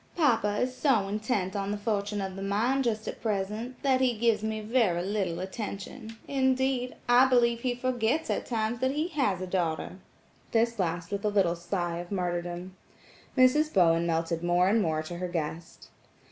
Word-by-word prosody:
"Papa 225 -10 +2
is 255 +2 -1
so 245 -9 +2
intent 210 -2 -1
on 200 -1 -2
the 205 - -1
fortunes 205 -1 -1
of 190 -1 -5
the 195 - -6
mine, 220 +7 +1
just 220 -4 -1
at - - -6
present, 215 +3 -3
that 265 -2 +3
he 245 -3 +2
gives 230 -1 +2
me 220 0 -2
very 215 -6 +1
little 190 -4 -1
attention. 210 +3 -6
Indeed, 260 -2 +1
I 245 +2 +6
believe 235 -2 +3
he 245 0 -1
forgets 255 +4 0
at - - -2
times 225 0 -1
that 260 +1 +1
he 310 +4 -1
has 265 - 0
a - - -2
daughter," 180 0 -2 0.5
this 230 0 +2
last 175 -1 -2
with 200 0 -3
a 210 - +2
little 195 -4 +2
sigh 175 0 -3
of 175 +2 -8
martyrdom. 175 -1 -3 0.6
Mrs. 295 +5 +4
Bowen 170 -2 +3
melted 165 0 -1
more 175 +1 +3
and 220 +2 +3
more 155 -3 0
to 170 +2 -7
her 180 - -2
guest. 165 -1 -5
210 Hz, 180 wpm, -28 LUFS, 180-245 Hz, 0.6 s, I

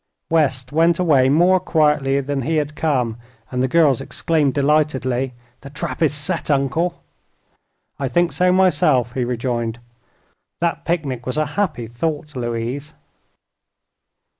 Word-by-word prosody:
West 135 -5 +1
went 165 +2 +3
away 145 -8 +3
more 175 +6 +4
quietly 150 -6 +2
than 140 0 -2
he 160 +6 -1
had 150 -1 -1
come, 125 -9 0 0.3
and 125 -1 -1
the 130 - +2
girls 145 -3 +3
exclaimed, 150 +1 0
delightedly: 135 -3 0 0.2
"The 140 - -11
trap 150 +2 -5
is 160 - +4
set, 150 +5 -3
Uncle!" 145 +5 0 1.0
"I 135 - -1
think 175 +7 +1
so, 180 0 +2
myself," 150 -9 +3
he 130 - -1
rejoined. 120 -1 -2 0.8
"That 170 0 -1
picnic 140 -8 -2
was 130 - -2
a 155 - +2
happy 150 - -1
thought, 150 +5 -4
Louise." 120 +4 -4
145 Hz, 135 wpm, -20 LUFS, 130-160 Hz, 1.0 s, more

